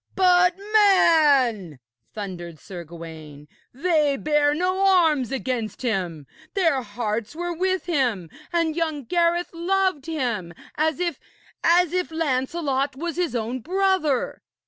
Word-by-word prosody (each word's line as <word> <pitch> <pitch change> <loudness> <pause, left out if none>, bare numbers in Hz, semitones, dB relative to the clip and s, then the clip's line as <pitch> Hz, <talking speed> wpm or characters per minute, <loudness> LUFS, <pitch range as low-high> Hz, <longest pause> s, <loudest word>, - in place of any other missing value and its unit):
'But, 360 -1 +4 0.2
man,' 290 - +4 0.3
thundered 175 -5 -7
Sir 175 +3 -9
Gawaine, 160 -3 -11 0.2
'they 300 -1 +1
bare 295 0 +2
no 370 +3 0
arms 320 - +3
against 255 -3 -3
him! 180 - -2 0.3
Their 325 -9 +2
hearts 220 +2 -4
were 350 +1 -3
with 370 +2 -1
him, 250 - 0 0.2
and 335 -2 0
young 315 -4 -2
Gareth 345 +4 +1
loved 370 -2 0
him 235 - -3 0.2
as 315 +2 0
if 345 -2 -2 0.4
as 345 0 +4
if 365 -1 0
Lancelot 280 -2 -1
was 335 +4 -4
his 345 -9 -1
own 235 +2 -2
brother.' 365 - 0
295 Hz, 125 wpm, -23 LUFS, 230-345 Hz, 0.4 s, But